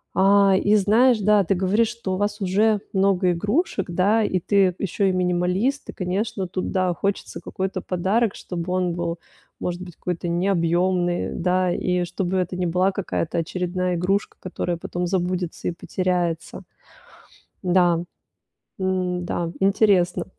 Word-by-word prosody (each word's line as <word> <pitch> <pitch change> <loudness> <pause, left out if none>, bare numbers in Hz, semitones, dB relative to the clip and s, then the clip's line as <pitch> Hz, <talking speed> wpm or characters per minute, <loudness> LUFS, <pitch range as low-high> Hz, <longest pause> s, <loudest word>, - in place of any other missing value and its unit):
Э, 195 0 +5
и 205 +2 +3
знаешь, 220 +4 +4
да, 205 0 +4
ты 195 - +1
говоришь, 195 +5 +2
что 230 -5 -4
у - - -1
вас 205 +1 -2
уже 205 +3 +2
много 190 -2 +2
игрушек, 205 - 0
да. 200 +6 +2
И 185 -3 0
ты 190 0 +2
ещё 195 +1 -1
и 190 - +3
минималист. 180 +9 0
И - - -5
конечно, 195 +1 -2
тут, 185 +1 -3
да, 185 -2 +1
хочется 200 +4 -3
какой-то 190 -1 -3
подарок, 195 +5 0
чтобы 180 0 -5
он 180 -2 0
был, 170 0 -3 0.4
может 180 0 -3
быть, 180 -3 -9
какой-то 175 -1 -4
необъёмный, 175 0 +1
да. 180 0 +1
И 180 0 0
чтобы 180 +1 -2
это 180 0 -1
не 180 0 -1
была 180 +3 +2
какая-то 185 -4 -2
очередная 180 +1 -2
игрушка, 195 +4 -1
которая 180 -1 -3
потом 175 +1 -3
забудется 180 -1 -2
и - - +1
потеряется. 175 -2 -2 1.0
Да, 175 -2 +3 0.8
м, 185 -1 -1
да, 170 -1 -3
интересно. 195 -2 +3
185 Hz, 145 wpm, -23 LUFS, 175-200 Hz, 1.0 s, Э